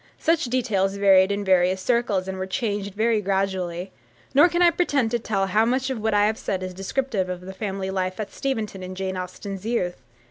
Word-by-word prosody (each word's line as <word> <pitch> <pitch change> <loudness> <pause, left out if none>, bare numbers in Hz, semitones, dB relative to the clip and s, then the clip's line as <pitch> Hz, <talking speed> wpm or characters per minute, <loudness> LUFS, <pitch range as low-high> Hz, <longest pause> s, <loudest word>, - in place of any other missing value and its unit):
Such 330 -1 +1
details 220 -6 0
varied 195 -1 +5
in 200 0 -2
various 185 0 +3
circles, 205 -3 0
and 190 0 -4
were 190 - -3
changed 205 -2 -2
very 220 0 +2
gradually; 190 -2 -1 0.4
nor 295 +6 +7
can 345 +1 +2
I 345 - +6
pretend 280 -10 +1
to 240 - +1
tell 200 -3 0
how 210 +3 +2
much 260 +3 0
of 240 -4 -4
what 220 -1 +1
I 205 0 +5
have 220 +1 0
said 185 -1 -2
is 185 0 -5
descriptive 195 0 -2
of 180 -1 -4
the 190 +1 -8
family 190 -1 -3
life 185 0 -2
at 210 -2 -5
Steventon 220 -8 -3
in 185 0 -7
Jane 190 0 -3
Austen's 185 +1 -6
youth. 210 -6 -2
200 Hz, 210 wpm, -24 LUFS, 190-230 Hz, 0.4 s, nor